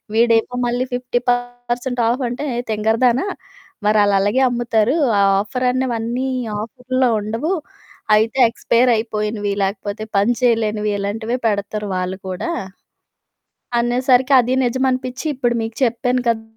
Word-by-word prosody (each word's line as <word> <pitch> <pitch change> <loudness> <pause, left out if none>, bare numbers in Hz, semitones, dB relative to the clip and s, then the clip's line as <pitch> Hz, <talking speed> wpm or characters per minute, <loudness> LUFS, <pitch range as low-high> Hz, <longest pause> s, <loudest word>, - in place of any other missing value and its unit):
వీడేమో 230 +1 +3
మళ్ళీ 245 +1 0
50% 245 0 -2
ఆఫంటే, 245 +2 -2
"ఏయ్! 240 - -2
తింగరదాన, 225 +4 +2 0.7
మరాళ్ళలగే 205 +3 +3
అమ్ముతారు. 240 +1 +1 0.2
ఆ - - +4 0.2
ఆఫరన్నవన్నీ 250 +1 -1 0.3
ఆఫరుల్లో 250 +3 -1
ఉండవు. 230 - -2 0.6
అయితే 220 +4 +1
ఎక్స్పైరయిపోయినివి, 220 -4 0
లేకపోతే 200 +2 -3
పని 205 +5 +3
చెయలేనివి, 215 -3 +1
ఇలాంటివే 220 +5 -2
పెడతారు 205 0 -2
వాళ్ళు 185 +1 -3
కూడా" 190 - -3 1.3
అనేసరికి 250 +2 +2
అదీ 250 +1 +1
నిజమనిపిచ్చి, 255 +2 -1
ఇప్పుడు 240 -2 0
మీకు 225 0 -6
చెప్పాను 245 +2 0
కదా! 225 -1 0
240 Hz, 100 wpm, -19 LUFS, 215-250 Hz, 1.3 s, ఆ